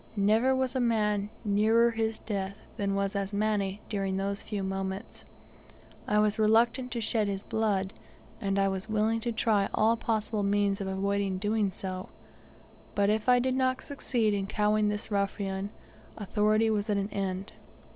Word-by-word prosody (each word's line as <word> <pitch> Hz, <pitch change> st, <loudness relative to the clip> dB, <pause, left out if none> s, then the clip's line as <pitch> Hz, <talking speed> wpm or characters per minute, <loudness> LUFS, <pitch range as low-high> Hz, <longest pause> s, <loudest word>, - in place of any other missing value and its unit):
Never 220 Hz, +6 st, +3 dB
was 260 Hz, 0 st, -1 dB
a -, -, +1 dB
man 210 Hz, -4 st, +1 dB, 0.2 s
nearer 220 Hz, +3 st, +4 dB
his 225 Hz, -1 st, -1 dB
death 200 Hz, -2 st, -4 dB, 0.2 s
than 200 Hz, -3 st, -1 dB
was 195 Hz, 0 st, -1 dB
Asmani 200 Hz, 0 st, -1 dB
during 195 Hz, -2 st, -1 dB
those 200 Hz, +1 st, -2 dB
few 205 Hz, -3 st, -4 dB
moments. 190 Hz, 0 st, -4 dB, 0.8 s
I 210 Hz, -, +2 dB
was 210 Hz, 0 st, +2 dB
reluctant 230 Hz, +4 st, +3 dB
to 235 Hz, -, -2 dB
shed 220 Hz, -1 st, 0 dB
his 195 Hz, 0 st, -3 dB
blood, 205 Hz, -3 st, 0 dB, 0.5 s
and 195 Hz, -2 st, 0 dB
I 195 Hz, 0 st, +3 dB
was 190 Hz, +2 st, -3 dB
willing 220 Hz, +1 st, +1 dB
to 235 Hz, +1 st, -2 dB
try 215 Hz, -3 st, +1 dB
all 225 Hz, +2 st, +4 dB
possible 220 Hz, -2 st, -1 dB
means 200 Hz, 0 st, +1 dB
to 195 Hz, -1 st, -3 dB
avoid 195 Hz, 0 st, -1 dB
doing 210 Hz, 0 st, +1 dB
so; 185 Hz, 0 st, -6 dB, 0.9 s
but 200 Hz, 0 st, +3 dB
if 215 Hz, +3 st, 0 dB
I 250 Hz, -, +7 dB
did 255 Hz, +1 st, +1 dB
not 260 Hz, 0 st, +1 dB
succeed 240 Hz, -6 st, 0 dB
in 195 Hz, -1 st, -1 dB
cowing 210 Hz, 0 st, +2 dB
this 210 Hz, +1 st, -4 dB
ruffian, 200 Hz, -1 st, -1 dB, 0.5 s
authority 215 Hz, +2 st, +2 dB
was 210 Hz, 0 st, -1 dB
at 205 Hz, -, +2 dB
an 200 Hz, +1 st, -1 dB
end. 195 Hz, -1 st, -3 dB
210 Hz, 165 wpm, -29 LUFS, 195-220 Hz, 0.9 s, I